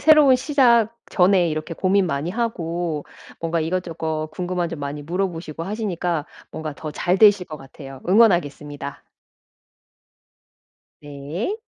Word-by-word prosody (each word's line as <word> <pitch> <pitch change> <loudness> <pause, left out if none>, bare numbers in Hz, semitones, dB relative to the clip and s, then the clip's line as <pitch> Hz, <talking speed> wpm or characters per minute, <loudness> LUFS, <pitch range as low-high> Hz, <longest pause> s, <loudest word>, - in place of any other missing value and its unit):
새로운 300 -4 +7
시작 240 -5 +3 0.2
전에 180 -2 +4
이렇게 155 +2 -3
고민 190 +2 +2
많이 145 +1 -2
하고 175 -8 -2 0.4
뭔가 165 0 -1
이것저것 160 -2 -2
궁금한 180 0 -2
점 165 -2 -6
많이 145 +1 -4
물어보시고 165 -1 -3
하시니까 180 -6 -2 0.2
뭔가 155 -2 -5
더 155 - -6
잘 175 +4 0
되실 205 -3 +6
것 155 - -7
같아요. 135 -1 -11
응원하겠습니다. 150 -9 +2 2.0
네. 145 - -4
170 Hz, 280 characters per minute, -22 LUFS, 155-195 Hz, 2.0 s, 새로운